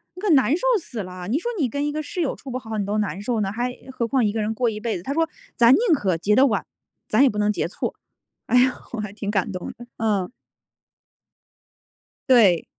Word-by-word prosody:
你 365 - -9
可 420 - 0
难 265 -3 +4
受 - - -1
死 240 -6 -7
了。 180 0 -7
你 270 +8 +1
说 475 - -3
你 275 -7 +1
跟 285 +5 -2
一 295 - -2
个 310 0 -3
室 360 - -6
友 320 -6 0
处 270 - -9
不 255 - -3
好 220 -3 -6
你 200 - -1
都 205 +1 -1
难 200 -2 -2
受 230 +1 -1
呢， 195 -1 -1
还 245 +2 -2 0.2
何 235 - -1
况 245 0 +1
一 205 - 0
个 220 - -1
人 215 +1 -1
过 240 +1 +1
一 215 -1 -6
辈 230 -3 -1
子。” 175 - -10
她 275 - -3
说： 325 +1 +1 0.3
“咱 235 0 +6
宁 - - +5 0.2
可 190 -9 0
结 210 +5 +2
得 270 - +6
晚， 215 -7 0 0.4
咱 220 +6 +4
也 275 - +6
不 210 - -5
能 210 0 +2
结 170 - -2
错。” - - -4 0.5
哎 250 - +3
呀， 255 0 +4 0.2
我 230 - -3
还 210 -1 -5
挺 205 -1 -5
感 200 0 0
动 180 - -5
的， 240 - -11
嗯。 205 -5 0 2.0
对。 210 -9 +5
225 Hz, 265 characters per minute, -23 LUFS, 205-260 Hz, 2.0 s, 咱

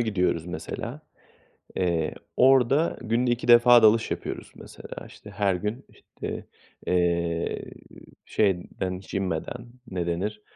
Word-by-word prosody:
gidiyoruz 90 -7 0
mesela, 80 -2 -6 0.8
eee, 85 -4 0 0.2
orada 135 +4 +4
günde 120 +2 +1
2 120 0 -2
defa 120 0 +8
dalış 110 +1 +5
yapıyoruz - - -5
mesela; - - -10
işte 105 - -13
her 100 -1 +1
gün, 105 +8 -4 1.0
eee, 85 -1 0 0.6
şeyden 95 -2 -1
hiç 95 - -11
inmeden, 100 +6 -3 0.2
ne 90 -2 -2
denir, 105 +5 -2
100 Hz, 110 wpm, -26 LUFS, 90-120 Hz, 1.0 s, defa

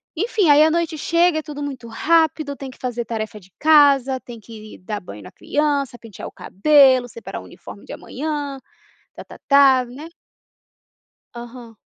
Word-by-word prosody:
Enfim, 415 0 0
aí 290 +1 +7
a 315 - +4
noite 335 -1 -1
chega, 335 0 +2
é - - -4
tudo 290 -2 -7
muito 260 -5 -7
rápido, 310 +2 +1
tem 275 -1 -8
que - - -18
fazer 245 -2 -4
tarefa 215 -1 -5
de 190 0 -22
casa, 280 -4 +4
tem 240 -2 -11
que 215 0 -12
ir - - -14
dar 205 +3 -5
banho 105 - -11
na - - -12
criança, 285 -4 -2
pentear 220 -5 -10
o - - -10
cabelo, 260 +2 +3
separar 230 - -8
o - - -13
uniforme - - -13
de - - -11
amanhã, 285 -1 -5 0.6
tá-tá-tá, 275 -3 +2
né. 280 +7 -10 1.3
Aham. 235 -1 -11
275 Hz, 165 wpm, -20 LUFS, 235-300 Hz, 1.3 s, aí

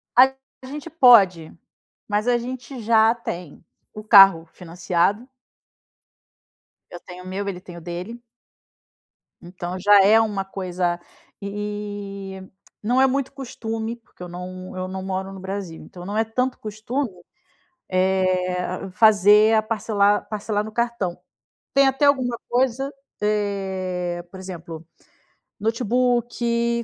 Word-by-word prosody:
A 260 +2 +7 0.4
gente 295 +4 -7
pode, 200 - +5 0.6
mas 210 +2 -1
a 245 -1 +4
gente 250 +2 -7
já 220 0 +5
tem 175 -9 -7 0.3
o 215 - -8
carro 195 -6 +7
financiado. 180 +5 -1 1.6
Eu 175 - -9
tenho 180 +1 -11
o - - -11
meu, 195 +2 -4
ele 190 -3 -4
tem 175 -2 -11
o - - -10
dele. 180 +8 -7 1.2
Então 180 +1 -6
já 205 +1 +6
é 215 +3 +6
uma 205 -3 -1
coisa 180 -2 -2 0.4
e 200 -1 -6 0.4
não 245 +5 +2
é 265 - +6
muito 265 0 -1
costume, 225 -4 -5
porque 230 -5 -23
eu - - -6
não 185 +1 -8
eu 185 0 -3
não 190 0 -6
moro 190 0 -3
no 195 - -9
Brasil, 190 -3 -6
então 175 -1 -11
não 205 +3 -3
é 220 - +3
tanto 250 +3 -2
costume, 225 +5 -3 0.8
eh, 185 0 0
fazer 210 +1 +5
a 220 - +4
parcelar 205 -2 +1
parcelar 210 0 -2
no 220 - -8
cartão. 235 -6 -2 0.6
Tem 275 0 +5
até 270 +2 +2
alguma 255 -4 +2
coisa, 260 +2 0 0.3
eh 190 -4 -2
por 190 - -10
exemplo, 170 -3 -8 0.7
notebook, 235 +1 0
205 Hz, 125 wpm, -23 LUFS, 185-235 Hz, 1.6 s, A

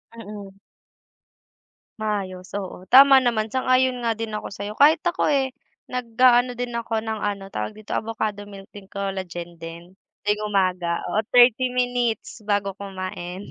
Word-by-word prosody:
Mm. 205 -3 -9 1.5
Maayos, 195 -4 -3
oo, 185 -2 -8
tama 270 +1 +8
naman, 225 -3 0
sang-ayon 255 -1 +2
nga 230 -2 0
din 225 -1 -4
ako 210 - -4
sa'yo. 200 +1 -6
Kahit 310 +7 +4
ako 350 +1 +1
eh, 270 -3 +1 0.3
nag-aano 245 0 +2
din 245 -1 -4
ako 230 -1 -2
ng 220 -1 -3
ano, 200 -1 -2
tawag 215 - -4
dito, 215 -1 -7
Avocado 215 -2 -3
milk 195 -1 -11
and 200 -2 -12
collagen 185 -4 -5
din 170 +2 -9 0.3
tuwing 210 0 0
umaga, 180 -4 0
oo, 210 - +1
30 245 +1 +6
minutes 245 -2 -1
bago 205 -1 +1
kumain. 185 -1 -6
215 Hz, 140 wpm, -23 LUFS, 195-245 Hz, 1.5 s, tama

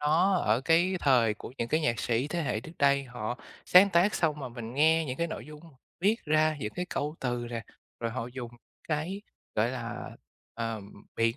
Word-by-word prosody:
nó 165 +6 +3
ở 110 -8 +2
cái 170 +6 +3
thời 120 -6 +4
của 115 - -10
những 115 - -1
cái 155 - +2
nhạc 120 -7 0
sĩ 120 +4 0
thế 170 +1 -1
hệ 110 -6 -1
trước 160 +8 -11
đây 140 -1 +4
họ 125 -1 -5 0.3
sáng 190 +2 +8
tác 185 +4 +4
xong 150 -3 +1
mà 130 - -4
mình 120 -1 -7
nghe 160 +3 +4
những 130 -3 -4
cái 170 - +1
nội - - -6
dung 150 0 -11 0.4
viết 205 +5 +3
ra, 155 0 +3
những 105 -4 -3
cái 180 0 -3
câu 150 +1 -2
từ 120 -2 -2
nè, 115 -2 -3 0.4
rồi 115 -1 -1
họ 120 0 -3
dùng 125 -1 -7 0.4
cái, 165 +6 -2 0.3
gọi 110 +3 +2
là, 120 -2 -5 0.4
ờ, 115 -1 -3 0.4
biện 115 0 +2
140 Hz, 205 wpm, -29 LUFS, 120-160 Hz, 0.4 s, sáng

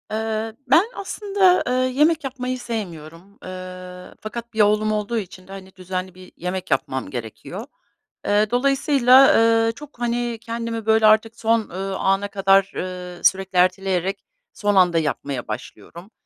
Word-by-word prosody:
Eee, 220 0 -2
ben 320 +9 +5
aslında, 395 -2 +2
eee, 250 - 0
yemek 280 +6 +2
yapmayı 255 -1 -4
sevmiyorum, 185 -5 -7
eee, 185 0 -9
fakat 235 +2 -7
1 220 - +2
oğlum 210 +1 +3
olduğu 215 +2 -1
için 185 -3 -7
de, - - -13
hani, 190 -1 -11
düzenli 185 0 -5
bir 185 0 -14
yemek 180 +1 -4
yapmam 130 0 -1
gerekiyor. 115 -4 -7 0.6
Eee, 205 +1 +3
dolayısıyla, 270 0 +5 0.3
eee, - - +1
çok, 285 +2 -13
hani, 240 0 -1
kendimi, 230 -1 -4
böyle, 220 0 +4
artık 220 +1 +4
son, 230 0 +2
ııı, 190 +2 -4
ana 195 +1 +1
kadar, 195 0 +3
ııı, 180 -1 -6
sürekli 190 -1 +2
erteleyerek 185 +1 +1 0.3
son 205 -2 0
anda 180 -3 +4
yapmaya 140 -4 -3
başlıyorum 170 - -9
205 Hz, 145 wpm, -22 LUFS, 185-235 Hz, 0.6 s, ben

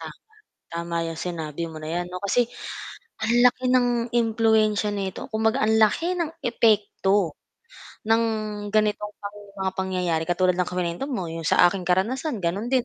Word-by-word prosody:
Tama, - - -8 0.6
tama 170 0 -3
'yong 165 -1 -5
sinabi 165 -3 -4
mo 160 - -10
na 155 0 -7
'yan 175 +1 -1
'no, 180 0 -5
kasi 235 +4 +2 0.7
ang 225 +1 +1
laki 250 +1 +4
ng 250 -1 +4 0.3
impluwensiya 220 -2 +2
nito 195 -2 -4
kumbaga 220 +3 +2
ang 220 +1 +3
laki 275 - +3
ng 325 -2 -1
epekto 205 -5 +2 0.8
ng 225 +1 +4 0.5
ganitong 210 -1 +1
pang 205 0 -7 0.2
mga 190 0 0
pangyayari, 180 -4 0
katulad 180 +1 +3
ng 180 -1 0
kuwento 180 +4 -2
mo 195 -9 -2
'yong 165 -1 -5
sa - - +5
aking 185 +1 -4
karanasan 235 - 0
gano'n 190 +6 -1
din, 255 -2 +3
205 Hz, 160 wpm, -24 LUFS, 180-225 Hz, 0.8 s, sa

